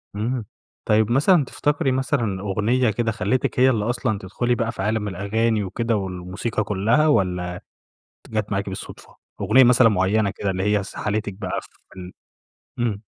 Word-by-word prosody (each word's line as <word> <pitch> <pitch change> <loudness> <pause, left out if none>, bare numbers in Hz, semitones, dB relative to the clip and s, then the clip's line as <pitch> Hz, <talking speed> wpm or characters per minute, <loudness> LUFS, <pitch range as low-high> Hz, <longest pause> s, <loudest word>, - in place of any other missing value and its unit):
إمم. 115 +2 -2 0.4
طيب 110 +1 +2
مثلًا 150 +4 +4
تفتكَري 145 0 0
مثلًا 125 -7 -1
أغنية 110 +5 +1
كده 115 +2 -1
خلّيتِك 125 +3 -1
هي 130 +1 +6
اللي 110 -5 0
أصلًا 120 -4 -1
تدخُلي 120 +6 -1
بقى 115 -2 -1
في 115 - -7
عالم 105 +1 -1
الأغاني 105 +3 0
وكده، 115 +4 -1
والموسيقى 95 +3 -3
كلّها، 110 +10 +2
والّا 90 -9 0 0.7
جات 110 -1 -2
معاكِ 100 0 -1
بالصدفة؟ 95 - -9 0.3
أغنية 130 - +6
مثلًا 125 -1 +6
معيّنة 100 +1 +1
كده، 100 - -2
اللي 95 0 -2
هي 100 - -2
سَحَلِتِك 105 +1 -3
بقى 95 - -4
في - - -21
ال 90 0 -8 0.7
إمم. 110 -4 -1
110 Hz, 155 wpm, -22 LUFS, 100-120 Hz, 0.7 s, هي